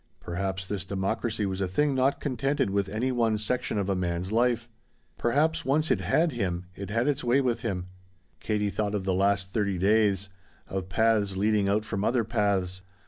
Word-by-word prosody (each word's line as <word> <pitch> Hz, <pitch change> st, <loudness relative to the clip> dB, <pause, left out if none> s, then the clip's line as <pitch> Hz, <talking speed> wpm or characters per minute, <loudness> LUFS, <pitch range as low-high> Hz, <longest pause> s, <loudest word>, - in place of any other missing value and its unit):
Perhaps 95 Hz, +1 st, -3 dB
this 95 Hz, -1 st, -4 dB
democracy 105 Hz, +3 st, -1 dB
was 95 Hz, 0 st, -3 dB
a 95 Hz, -, +1 dB
thing 140 Hz, +11 st, +1 dB
not 135 Hz, +2 st, +2 dB
contented 135 Hz, -4 st, 0 dB
with 100 Hz, -1 st, 0 dB
any 115 Hz, +5 st, -1 dB
one 115 Hz, -3 st, +2 dB
section 105 Hz, +1 st, -2 dB
of 100 Hz, -2 st, 0 dB
a 100 Hz, -, +1 dB
man's 90 Hz, +1 st, -2 dB
life. 120 Hz, +1 st, +2 dB, 0.5 s
Perhaps 155 Hz, +6 st, +2 dB
once 150 Hz, +3 st, +1 dB
it -, -, +3 dB
had 165 Hz, +1 st, +2 dB
him 90 Hz, -7 st, -2 dB
it 100 Hz, 0 st, -7 dB
had 115 Hz, +5 st, +1 dB
its 145 Hz, -3 st, 0 dB
way 125 Hz, +3 st, +3 dB
with 125 Hz, -4 st, 0 dB
him. 95 Hz, -7 st, -2 dB, 0.5 s
Katie 105 Hz, -2 st, -1 dB
thought 105 Hz, 0 st, -1 dB
of 95 Hz, -2 st, -2 dB
the 95 Hz, -, +1 dB
last 95 Hz, 0 st, +1 dB
thirty 100 Hz, -3 st, 0 dB
days 100 Hz, 0 st, +2 dB, 0.4 s
of 95 Hz, -1 st, -4 dB
paths 105 Hz, -1 st, +2 dB
leading 105 Hz, 0 st, +2 dB
out 105 Hz, +2 st, +1 dB
from 100 Hz, -1 st, -2 dB
other 120 Hz, +1 st, +2 dB
paths. 100 Hz, -5 st, 0 dB
105 Hz, 190 wpm, -27 LUFS, 95-120 Hz, 0.5 s, it